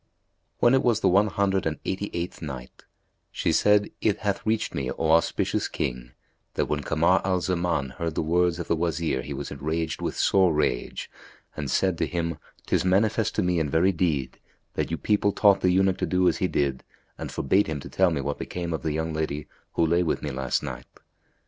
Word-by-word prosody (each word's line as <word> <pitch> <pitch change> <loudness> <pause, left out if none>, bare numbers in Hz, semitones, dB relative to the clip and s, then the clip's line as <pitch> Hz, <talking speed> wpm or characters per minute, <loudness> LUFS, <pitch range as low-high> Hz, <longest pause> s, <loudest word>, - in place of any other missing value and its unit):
When 120 - +4
it 135 - +4
was 115 -3 +2
the - - +3
One 100 +3 +4
Hundred 95 -3 0
and 80 -2 -2
Eighty 95 +2 -2
eighth 85 +1 -4
Night, 65 -5 -8 0.5
She - - 0
said, 105 0 +3
It 105 - +2
hath 100 -2 -1
reached 110 0 0
me, 65 -2 -2
O 80 -1 0
auspicious 85 +1 +2
King, - - -4 0.4
that - - +1
when 75 -1 -2
Kamar 85 +5 +2
al 95 -1 +1
Zaman 85 -6 -1
heard 80 +1 -4
the - - 0
words 85 +1 +2
of 85 - -5
the - - +2
Wazir 80 -4 -1
he - - -8
was - - -6
enraged 80 +2 -3
with - - -3
sore 95 -3 +4
rage 65 -5 -1 0.5
and 75 -3 -4
said 90 +5 +1
to - - +1
him, 85 -2 -2 0.3
"'Tis - - +1
manifest 105 +3 +2
to - - +1
me 90 -1 +1
in 75 -2 0
very 85 +6 +3
deed 80 -7 -1 0.3
that - - -2
you 80 - -2
people 100 +6 +2
taught 100 -2 +4
the 90 - +3
eunuch 95 +1 +2
to - - 0
do 90 0 +2
as - - +2
he 95 - +1
did 70 -6 -1 0.4
and - - -5
forbade 95 +9 +2
him 75 -2 -3
to - - -8
tell 95 -1 +3
me 80 -4 -1
what 70 +1 -3
became 85 -2 -4
of 80 - -3
the 80 - -1
young 80 +1 -2
lady 75 -2 -3 0.3
who 85 - +2
lay 85 +2 +2
with 85 - -1
me 75 - -2
last 65 0 -1
night. - - -6
85 Hz, 210 wpm, -26 LUFS, 75-95 Hz, 0.5 s, When